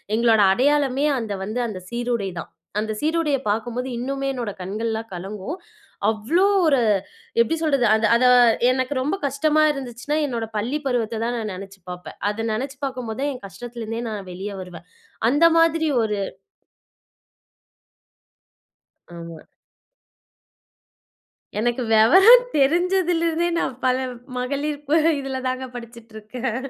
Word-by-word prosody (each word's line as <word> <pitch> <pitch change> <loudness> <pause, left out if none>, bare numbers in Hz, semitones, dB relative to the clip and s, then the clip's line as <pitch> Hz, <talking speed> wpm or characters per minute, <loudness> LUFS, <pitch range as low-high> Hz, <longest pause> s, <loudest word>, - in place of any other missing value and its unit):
எங்களோட 225 -2 +4
அடையாளமே 280 +2 +2
அந்த 220 -3 -4
வந்து 230 +4 -2
அந்த 195 -4 -6
சீருடை 235 -5 -2
தான். - - -8 0.3
அந்த 220 0 -2
சீருடைய 310 -2 +1
பார்க்கும்போது 240 +4 -2
இன்னுமே 275 +2 -3
என்னோட 235 -5 -3
கண்கள்லாம் 220 +4 -3
கலங்கும். 200 - -6 0.5
அவ்ளோ 235 - +1 0.2
ஒரு 275 -4 +4 0.6
எப்படி 235 +8 +1
சொல்றது? 275 -6 +2
அது 220 0 +1
அத 250 +2 +3 0.5
எனக்கு 260 +2 -1
ரொம்ப 300 +8 0
கஷ்டமா 305 +3 +2
இருந்துச்சுன்னா, 270 +2 -4
என்னோட 235 -4 -3
பள்ளி 245 +8 -1
பருவத்த 230 -3 -1
தான் 240 +1 -1
நான் 215 -3 -3
நெனச்சு 195 +1 -10
பாப்பேன். 180 0 -8
அத 225 +2 -3
நெனச்சு 265 +5 -3
பார்க்கும் 255 -4 -5
போதான் 275 +6 -2
என் 250 - -11
கஷ்டத்துல 235 +3 -8
இருந்தே 225 +2 -4
நான் 200 -4 -6
வெளிய 195 +3 -6
வருவேன். 180 -1 -11 0.4
அந்த 290 +5 +4
மாதிரி 330 -1 +3
ஒரு 210 -2 -1 3.0
ஆமா. 165 -2 -9 2.2
எனக்கு 240 +3 0
வெவரம் 385 - +7
தெரிஞ்சதிலிருந்தே 340 +2 +2
நான் 260 - -2
பல 255 0 +3 0.4
மகளிர் 285 +3 -2
ப 320 +2 +4 0.2
இதுல 265 -1 -4
தாங்க 255 0 -3
படிச்சுட்ருக்கேன். 235 0 -6
245 Hz, 125 wpm, -22 LUFS, 220-285 Hz, 3.0 s, வெவரம்